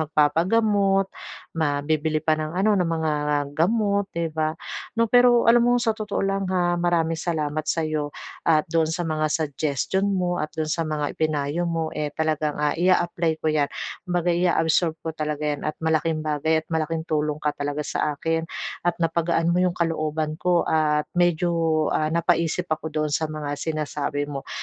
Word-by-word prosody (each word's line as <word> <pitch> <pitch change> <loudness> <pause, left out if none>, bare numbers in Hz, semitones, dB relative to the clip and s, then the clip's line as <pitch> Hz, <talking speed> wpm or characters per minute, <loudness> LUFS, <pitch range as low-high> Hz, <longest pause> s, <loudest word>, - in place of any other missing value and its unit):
mag 155 - -2
papa-gamot, 195 +5 +3 0.5
ma 145 -2 0
bibili 155 0 0
pa 160 - +3
ng 155 +2 -2
ano, 205 +3 +3
ng 180 -4 +2
mga 160 -2 0 0.4
gamot 200 +4 +1
'di 165 -1 -3
ba 155 0 -1 0.4
'no. 230 - +4
Pero 245 -1 +6
alam 235 +1 +6
mo 245 +1 +4
sa 235 -2 +1
totoo 215 -2 -3
lang 195 -1 -1
ha, 180 -2 +1
maraming 165 -2 +1
salamat 155 -3 -1
sa'yo 155 -2 0 0.4
at 155 -2 +4
doon 165 -1 +2
sa 160 +2 -2
mga 155 -1 0
suggestion 155 +5 -1
mo 180 -3 0
at 155 - -2
doon 155 -1 -1
sa 165 -1 -1
mga 150 -1 -2
i-pinayo 155 +2 -1
mo, 165 -1 -2
eh, 150 - -2
talagang, 155 -1 0
ah, 150 0 +1
i-a-apply 175 -1 +2
ko 155 - +2
'yan. 145 -2 +2 0.4
Kumbaga 175 0 +1
ia-absorb 170 -1 +2
ko 160 - -2
talaga 150 -1 -3
'yan 150 0 -1
at 155 - -5
malaking 160 0 +1
bagay 155 +1 +1
at - - -51
malaking 160 0 -1
tulong 150 -2 -1
ka 150 -1 -1
talaga 145 +1 -3
sa 150 0 -1
akin 165 +2 -1 0.4
at 175 - 0
na-pagaan 165 0 +1
mo 180 - +2
'yong 180 -1 +1
kalooban 155 -2 -1
ko 175 -1 +2
at 150 -1 +2
medyo, 175 0 +2 0.4
ah, 155 - +1
napa-isip 170 +1 +1
ako 155 0 -3
doon 155 -1 -2
sa 160 0 0
mga 150 -2 -4
sinasabi 150 -2 -2
mo. 140 -2 -7
160 Hz, 175 wpm, -24 LUFS, 155-175 Hz, 0.5 s, Pero